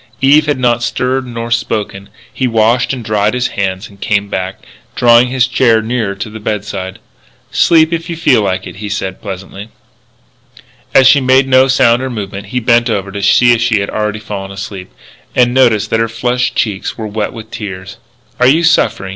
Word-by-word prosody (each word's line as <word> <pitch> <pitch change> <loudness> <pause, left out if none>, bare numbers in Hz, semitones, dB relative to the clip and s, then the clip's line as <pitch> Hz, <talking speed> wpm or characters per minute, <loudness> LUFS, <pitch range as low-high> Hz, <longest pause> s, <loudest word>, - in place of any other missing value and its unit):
Eve 150 +3 +4
had 145 - +1
not 120 -2 +1
stirred 130 +2 -1
nor 115 -1 -6
spoken. 105 -4 -2 0.2
He 130 - -1
washed 115 +2 +2
and 125 -4 -5
dried 105 +1 0
his 125 0 -1
hands 95 +1 -3
and 100 -1 -19
came 100 -1 0
back, 95 0 -4 0.3
drawing 120 +1 +5
his 125 0 +1
chair 120 -2 +2
nearer 110 -3 -2
to 100 +3 -5
the 110 +1 -9
bedside. 100 -3 -4 0.5
"Sleep, 160 0 +3
if 165 +1 -3
you 170 - -3
feel 135 -8 +3
like 95 -2 -2
it," - - -9
he 105 0 -6
said 95 -2 -4
pleasantly. 95 +2 -8 1.3
As 135 - +6
she 135 +2 +6
made 130 +1 +3
no 130 0 +4
sound 130 -2 +3
or 130 - -3
movement 100 -4 -6
he 125 +5 -2
bent 120 0 +2
over 100 -3 -2
to 100 +1 -5
see 120 +5 +4
if 115 - -1
she 115 -2 +2
had 100 - -3
already 105 0 -2
fallen 105 -2 -7
asleep. 100 - -8 0.4
And 120 -1 +3
noticed 120 -5 +2
that 115 - +1
her 115 0 0
flushed 125 +3 -1
cheeks 100 -4 -2
were 110 - -5
wet 105 0 -3
with 115 -3 -11
tears. 100 -2 -7 0.4
"Are 125 - +4
you 155 +6 +3
suffering?" 155 - +1
115 Hz, 195 wpm, -13 LUFS, 100-125 Hz, 1.3 s, As